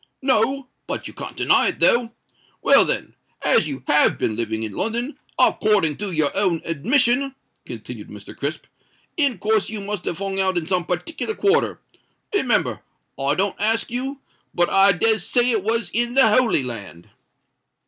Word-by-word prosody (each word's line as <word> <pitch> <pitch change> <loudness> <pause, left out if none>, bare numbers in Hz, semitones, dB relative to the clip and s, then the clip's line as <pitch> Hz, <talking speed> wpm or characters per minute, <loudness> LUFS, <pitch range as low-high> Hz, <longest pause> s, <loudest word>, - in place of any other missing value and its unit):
"No—but 265 +1 -1
you - - -11
can't - - -8
deny - - +3
it, - - -2
though. 235 -1 +3 0.5
Well, - - +6
then—as 155 - -1
you 135 -3 -6
have 150 - +4
been 110 - -1
living 110 -1 -3
in 110 - -4
London, 235 - -3 0.2
according 200 -8 +2
to 205 -2 -4
your 155 -4 0
own 185 -5 +1
admission," 250 - +1 0.3
continued - - -8
Mr. - - -11
Crisp, - - -4 0.5
"in 280 -8 +1
course 215 +2 0
you 220 -1 -5
must 205 -1 -5
have 170 - -3
hung 195 0 -3
out 190 -1 +1
in 170 - -1
some 180 -1 -1
partickler 325 - -3
quarter. 405 +4 +1 0.5
Remember, 405 - 0 0.4
I 140 +2 +1
don't 195 +3 -1
ask 225 +2 0
you—but 255 -8 -4
I 195 0 +6
des 220 +4 +2
say 245 +7 +2
it 220 -4 0
was 225 +1 -1
in 240 +2 -1
the 265 -5 +6
Holy 225 - +3
Land." 100 -9 -8
210 Hz, 160 wpm, -21 LUFS, 170-240 Hz, 0.5 s, Well